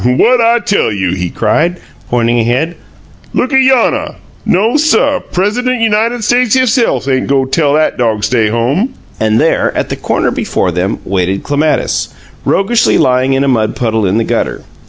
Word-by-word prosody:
"What 225 - +3
I 230 +1 +3
tell 205 - 0
you?" 95 -4 -1
he 90 -1 -3
cried, 155 - 0 0.3
pointing 120 0 +1
ahead. 125 +9 0 0.6
"Look 255 - 0
ayonnuh! 265 -2 +2 0.3
NO, 215 +8 +2
suh, 290 -2 +2
Pres'dent 240 +7 -1
United 225 +1 0
States 245 +1 +2
hisse'f 255 - +1
ain' 130 -1 0
go 135 -1 +1
tell 145 +1 +1
'at 155 - 0
dog 110 -3 0
stay 115 -1 +1
home!" 135 - -1 0.2
And 110 0 +1
there, - - +1
at - - -2
the - - -2
corner - - -1
before 90 - -1
them, 90 +5 -2
waited 95 0 -1
Clematis, 150 +2 -1 0.4
roguishly 230 +5 +2
lying 130 +1 +2
in 135 +1 +1
a - - 0
mud 115 -5 0
puddle 110 -4 -1
in 95 +4 0
the 115 - +1
gutter. - - -2
140 Hz, 165 wpm, -12 LUFS, -, 0.6 s, What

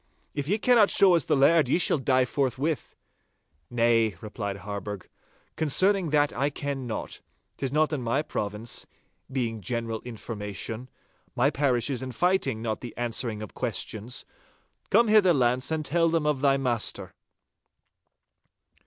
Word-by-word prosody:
'If 145 -1 -3
ye 205 +5 +2
cannot 225 -2 +4
show 190 -2 +5
us 165 -5 +3
the - - +2
laird, 145 +1 +4
ye 145 - +3
shall 170 -3 +2
die 130 -1 +2
forthwith!' 135 +4 -2 0.7
'Nay,' 115 -3 +2
replied 100 -2 -5
Harburgh, 100 -1 -6 0.5
'concerning 185 +4 +2
that 145 0 +2
I 140 +4 +1
ken 140 -2 -4
not. 110 - -5 0.4
'Tis 135 -2 -2
not 155 +1 +2
in 145 - -2
my 120 +5 0
province, 105 -4 -3 0.4
being 115 -4 -2
general 115 +2 -3
information. 110 0 -6 0.5
My 135 +4 +3
parish 140 -3 +1
is 130 - -2 0.2
fighting, 175 -11 +1
not 110 -2 -2
the 120 - -9
answering 115 -2 -2
of 105 - -9
questions. 115 0 -3 0.6
Come 230 +3 +4
hither, 205 -5 +5
Launce, 125 0 +2
and 160 -1 -2
tell 165 +3 +2
them 165 -2 0
of 150 -3 0
thy 140 -1 +4
master! 120 -5 -1
130 Hz, 145 wpm, -27 LUFS, 115-150 Hz, 0.7 s, show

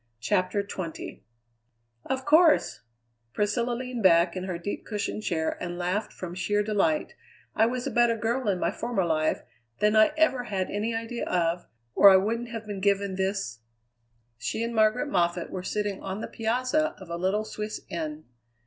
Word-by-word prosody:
CHAPTER 200 - 0
XX 185 -4 -6 0.9
"Of 265 0 -2
course," 315 +2 +4 0.5
Priscilla 235 +4 0
leaned 250 -1 -4
back 170 -2 +5
in 185 0 -3
her 185 -2 -3
deep 175 +4 -5
cushioned 210 0 -3
chair 160 -6 -2
and 175 -1 -4
laughed 185 +4 -1
from 175 -2 -7
sheer 205 +3 0
delight, 215 +9 0 0.4
"I 220 +1 +4
was 250 +1 -3
a - - -2
better 240 -1 +3
girl 235 +3 -1
in 185 -2 0
my 170 - +1
former 225 -4 -1
life 155 -1 0 0.4
than 210 +1 +3
I 215 +7 +6
ever 265 -6 +2
had 195 -4 -2
any 220 +3 -1
idea 230 +1 -3
of, 175 0 0 0.3
or 200 - +8
I 190 - +8
wouldn't 230 +5 -1
have 225 -1 -6
been 205 -2 -5
given 200 0 +1
this 190 - -2 0.4
" 115 0 -44
She 220 - -2
and 235 0 -3
Margaret 220 +5 +3
Moffatt 175 -8 0
were 185 - -4
sitting 205 +1 -2
on 195 +1 -4
the - - -4
piazza 255 +7 0
of 190 -4 -11
a - - -2
little 190 +5 0
Swiss 215 0 -5
inn. 155 -2 -5
205 Hz, 175 wpm, -27 LUFS, 180-230 Hz, 0.9 s, or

